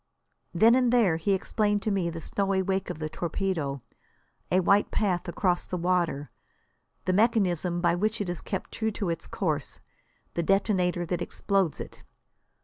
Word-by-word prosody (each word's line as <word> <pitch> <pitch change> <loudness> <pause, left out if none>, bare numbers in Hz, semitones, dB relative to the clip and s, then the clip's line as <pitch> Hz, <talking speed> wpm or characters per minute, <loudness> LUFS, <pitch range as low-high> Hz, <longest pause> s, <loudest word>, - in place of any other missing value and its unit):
Then 230 +1 +5
and 250 -1 +3
there 215 -10 +4
he 195 +5 +1
explained 205 +1 0
to 215 - 0
me 190 -4 0
the 165 0 -6
snowy 195 +3 0
wake 190 0 -1
of - - -4
the 155 0 -3
torpedo, 160 -6 -2 0.7
a 185 - +4
white 200 +3 +3
path 185 -5 0
across 175 0 0
the 180 - -3
water; 170 -5 0 0.7
the 185 - +1
mechanism 185 -5 +2
by 175 -1 +3
which 210 +5 0
it 205 - -2
is 175 -1 -4
kept 190 - -5
true 220 -1 -1
to 195 -3 -2
its 165 - -5
course; 155 -7 -2 0.5
the 170 - 0
detonator 180 -1 +1
that 175 +1 -2
explodes 190 -2 0
it. - - -8
185 Hz, 165 wpm, -27 LUFS, 170-200 Hz, 0.7 s, Then